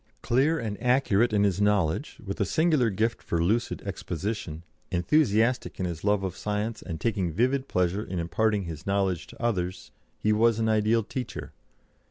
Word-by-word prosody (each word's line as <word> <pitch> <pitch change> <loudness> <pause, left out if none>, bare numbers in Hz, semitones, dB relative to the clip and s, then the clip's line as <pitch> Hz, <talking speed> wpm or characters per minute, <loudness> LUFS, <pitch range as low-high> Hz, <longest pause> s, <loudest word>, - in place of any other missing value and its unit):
Clear 135 +7 +2
and 110 -7 -4
accurate 125 -3 +3
in 105 -1 +3
his 100 -1 +1
knowledge, 105 - +1
with 100 0 -4
a - - +5
singular 155 -7 +2
gift 110 +3 -1
for 85 - -2
lucid 110 +8 0
exposition, 90 -3 -4 0.3
enthusiastic 115 - +2
in 95 - 0
his 85 -3 -5
love 105 -1 +2
of 95 -2 -3
science, 105 +2 -3
and 80 -4 -6
taking 95 -5 0
vivid 130 - +1
pleasure 90 +3 0
in 95 - -5
imparting 105 +5 +1
his 80 -2 -7
knowledge 95 -3 0
to - - -14
others, 90 -6 -2 0.3
he 105 - +1
was 115 +1 +3
an 115 0 +1
ideal 110 +1 +3
teacher. 125 +4 -6
105 Hz, 170 wpm, -27 LUFS, 90-115 Hz, 0.3 s, a